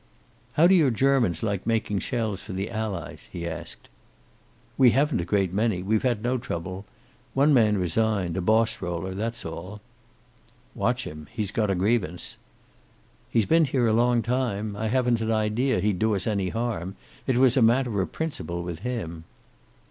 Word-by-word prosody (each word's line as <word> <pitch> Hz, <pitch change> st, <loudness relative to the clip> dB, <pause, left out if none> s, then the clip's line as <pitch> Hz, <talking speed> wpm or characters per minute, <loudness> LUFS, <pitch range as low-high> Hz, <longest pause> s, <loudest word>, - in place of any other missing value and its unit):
"How 160 Hz, -, +5 dB
do 185 Hz, -, +6 dB
your 160 Hz, -7 st, +5 dB
Germans 120 Hz, -, +2 dB
like 100 Hz, -2 st, -2 dB
making 110 Hz, -3 st, 0 dB
shells 110 Hz, -6 st, -2 dB
for 110 Hz, -, -8 dB
the 95 Hz, +2 st, -3 dB
Allies?" 110 Hz, -6 st, -5 dB
he 85 Hz, -1 st, -5 dB
asked. -, -, -7 dB, 0.9 s
"We 130 Hz, -2 st, +6 dB
haven't 140 Hz, -, +2 dB
a -, -, -4 dB
great 95 Hz, -2 st, +1 dB
many. 105 Hz, -3 st, 0 dB
We've 110 Hz, +2 st, +1 dB
had 120 Hz, -4 st, 0 dB
no 125 Hz, +1 st, 0 dB
trouble. 95 Hz, -2 st, -5 dB, 0.5 s
One 145 Hz, +2 st, +4 dB
man 110 Hz, -5 st, +4 dB
resigned 95 Hz, -1 st, 0 dB
a 95 Hz, -, -1 dB
boss 110 Hz, +3 st, +2 dB
roller. 90 Hz, +1 st, -3 dB
That's 115 Hz, +4 st, -4 dB
all." 85 Hz, +5 st, -7 dB, 0.9 s
"Watch -, -, 0 dB
him. 75 Hz, 0 st, -8 dB
He's 105 Hz, -3 st, -3 dB
got 110 Hz, -1 st, 0 dB
a 95 Hz, -, +2 dB
grievance." 90 Hz, -3 st, -1 dB, 0.9 s
"He's 115 Hz, -3 st, +2 dB
been 165 Hz, +4 st, +4 dB
here 130 Hz, -3 st, +1 dB
a 110 Hz, -, +3 dB
long 120 Hz, +1 st, +3 dB
time. 110 Hz, -5 st, -1 dB
I 110 Hz, +2 st, -2 dB
haven't 120 Hz, -1 st, +1 dB
an 110 Hz, 0 st, 0 dB
idea 110 Hz, +3 st, +1 dB
he'd 100 Hz, -2 st, 0 dB
do 110 Hz, -1 st, +2 dB
us 95 Hz, -, -2 dB
any 100 Hz, -4 st, 0 dB
harm. 105 Hz, -4 st, -3 dB, 0.3 s
It 130 Hz, -2 st, +2 dB
was 130 Hz, -1 st, +5 dB
a 130 Hz, -, +3 dB
matter 115 Hz, -2 st, +3 dB
of 95 Hz, -, -3 dB
principle 85 Hz, -, -4 dB
with 85 Hz, -2 st, -5 dB
him." 90 Hz, -8 st, -5 dB
110 Hz, 175 wpm, -26 LUFS, 95-120 Hz, 0.9 s, do